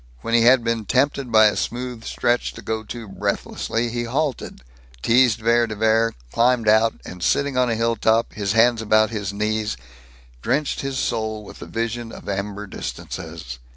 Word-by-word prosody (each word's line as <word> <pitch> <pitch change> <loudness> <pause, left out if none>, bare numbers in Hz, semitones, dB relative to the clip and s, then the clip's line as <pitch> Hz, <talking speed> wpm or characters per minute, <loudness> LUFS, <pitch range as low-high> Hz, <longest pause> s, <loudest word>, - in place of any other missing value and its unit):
When 115 - -4
he 120 - +5
had 120 +1 +5
been 115 -2 -1
tempted 135 +1 +1
by 110 -1 +7
a 105 - +3
smooth 125 -1 -4
stretch 120 0 0
to - - -11
go 110 -1 -2
too 115 +1 -8
breathlessly, 115 +4 -2
he 120 0 -3
halted, 135 - -2 0.4
teased 120 -1 +4
Vere 115 +1 +2
de 110 - -5
Vere, 110 +1 +2 0.2
climbed 120 -1 +2
out 110 +1 +4
and, 90 0 -9
sitting 140 +8 +1
on 125 -1 +2
a 115 - +1
hilltop, 115 0 +1
his 100 -2 -1
hands 115 0 +4
about 110 0 +3
his 105 -3 -3
knees, 105 - -1 0.6
drenched 140 - 0
his 135 -1 -3
soul 110 -3 -2
with - - -12
the - - -8
vision 115 0 -3
of - - -11
amber 100 +1 -3
distances. - - -7
115 Hz, 175 wpm, -22 LUFS, 110-120 Hz, 0.6 s, by